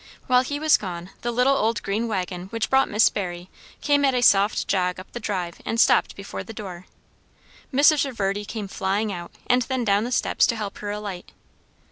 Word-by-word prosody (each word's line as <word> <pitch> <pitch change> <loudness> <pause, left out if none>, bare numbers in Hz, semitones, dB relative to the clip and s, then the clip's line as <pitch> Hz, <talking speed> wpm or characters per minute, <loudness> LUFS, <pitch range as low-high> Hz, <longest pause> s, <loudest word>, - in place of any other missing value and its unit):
While 250 -1 +4
he 285 +3 -4
was 310 0 +5
gone, 180 -2 -7
the 240 - -2
little 250 +3 +3
old 225 -2 0
green 215 +4 -1
waggon 180 -4 -3
which 225 +2 -3
brought 265 0 +4
Miss 210 +2 +5
Barry 180 -2 -5 0.3
came 285 -1 +2
at 270 -2 +3
a 245 - +1
soft 205 -1 +4
jog 180 -1 0
up 185 - -12
the 240 - -6
drive 185 -6 -4
and 230 - -2
stopped - - +4
before 195 0 -7
the 225 - -10
door. 185 -4 -8 0.8
Mrs. 290 +2 +5
Reverdy 205 -6 -2
came 210 -1 -5
flying 195 +2 -1
out 175 -1 -7 0.2
and 250 0 +3
then 255 +1 -2
down 205 -1 +2
the 245 - -4
steps - - +2
to 235 - 0
help 210 -3 -5
her 205 - -5
alight. 205 -3 -6
210 Hz, 200 wpm, -24 LUFS, 190-245 Hz, 0.8 s, was